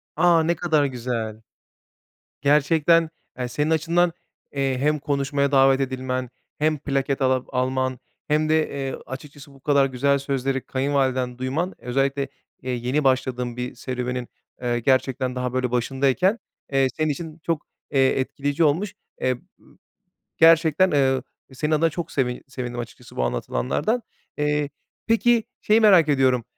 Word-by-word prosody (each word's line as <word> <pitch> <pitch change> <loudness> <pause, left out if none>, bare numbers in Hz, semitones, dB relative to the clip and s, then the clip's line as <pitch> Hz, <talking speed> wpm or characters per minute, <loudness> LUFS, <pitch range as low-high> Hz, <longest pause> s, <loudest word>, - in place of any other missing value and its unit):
A! 170 -2 +4
Ne 170 +2 +1
kadar 155 -3 +2
güzel. 115 -4 -3 1.0
Gerçekten, 155 +3 +3 0.3
eee, 125 -1 -2
senin 150 +5 -1
açından, 170 +2 +2 0.4
eee, 135 -2 0
hem 150 +2 +1
konuşmaya 140 0 0
davet 135 0 +5
edilmen, 130 -1 -2 0.3
hem 155 0 +1
plaket 135 -1 -1
ala 130 -1 +2
alman 130 0 -1 0.3
hem 155 +1 +2
de, 155 0 +2
eee, 135 -1 -4
açıkçası 140 +2 -10
bu 135 - -18
kadar 140 0 +3
güzel 140 +2 +1
sözleri 135 -1 -1
kayınvaliden 130 -2 0
duyman 145 +9 -2
özellikle, 135 +2 -1 0.3
eee, 130 - -4
yeni 125 +4 -1
başladığın 125 -2 0
bir 125 0 -4
serüvenin, 125 0 -4 0.3
eee, 120 -1 0
gerçekten 130 0 +1
daha 125 -1 -2
böyle 130 -1 0
başındayken, 135 - +1 0.3
eee, 135 -1 +3
senin 155 -1 +1
için 160 +2 -8
çok, 165 -3 -2 0.2
eee, 135 -1 +3
etkileyici 145 +4 -1
olmuş. 170 +7 +1 0.3
Eee, 130 - +1 0.3
ııı, - - -23 0.6
gerçekten, 165 +2 +5
ııı, 135 -2 +2 0.3
senin 150 +4 -2
adına 160 +2 +3
çok 170 +1 -5
sevin 125 -3 -1
sevindim 125 -2 -5
açıkçası 120 - -9
bu 65 - 0
anlatılanlardan. 65 - -1 0.4
Eee, 150 -1 0 0.4
peki, 230 0 +3 0.2
şeyi 215 +2 +4
merak 185 -8 +6
ediyorum. 130 -4 +3
135 Hz, 140 wpm, -23 LUFS, 130-155 Hz, 1.0 s, merak